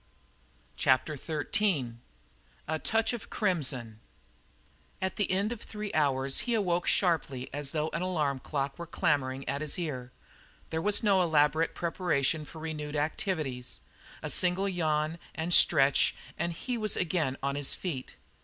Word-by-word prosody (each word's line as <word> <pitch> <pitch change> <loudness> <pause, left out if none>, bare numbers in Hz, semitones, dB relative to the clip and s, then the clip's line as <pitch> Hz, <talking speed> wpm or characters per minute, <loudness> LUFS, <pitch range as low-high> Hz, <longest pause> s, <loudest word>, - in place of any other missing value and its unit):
CHAPTER 130 +4 +3
XIII 150 - 0 0.7
A 160 0 -1
TOUCH 225 +6 +1
OF 235 - -6
CRIMSON 130 - -1 1.0
At 190 0 -2
the 205 - 0
end 195 +4 +1
of 240 - -5
three 210 -1 -6
hours 135 -3 +2
he 240 -2 0
awoke 180 -5 +1
as - - +2
sharply 145 -8 +1
as 145 -1 -1
though 155 +1 -1
an 165 - -3
alarm 150 -7 0 0.4
were 170 -1 -6
clamouring 135 -4 0
at 140 +2 -1
his 155 -2 -2
ear. 130 -8 -4 0.6
There 160 - -1
was 205 +4 +3
no 200 -3 +4
elaborate 160 -1 +3
preparation 160 -3 0
for 160 - -12
renewed 155 -2 -5
activities. 150 -4 -2 0.4
A - - -2
single 185 +2 +2
yawn 160 -3 0 0.2
and 165 +2 -1
stretch 140 -5 +5 0.2
and 170 - -1
he 240 +8 -3
was 215 -2 0
again 160 -6 0
on 140 0 0
his 145 -1 -1
feet. 150 -9 -5
160 Hz, 145 wpm, -30 LUFS, 140-185 Hz, 1.0 s, stretch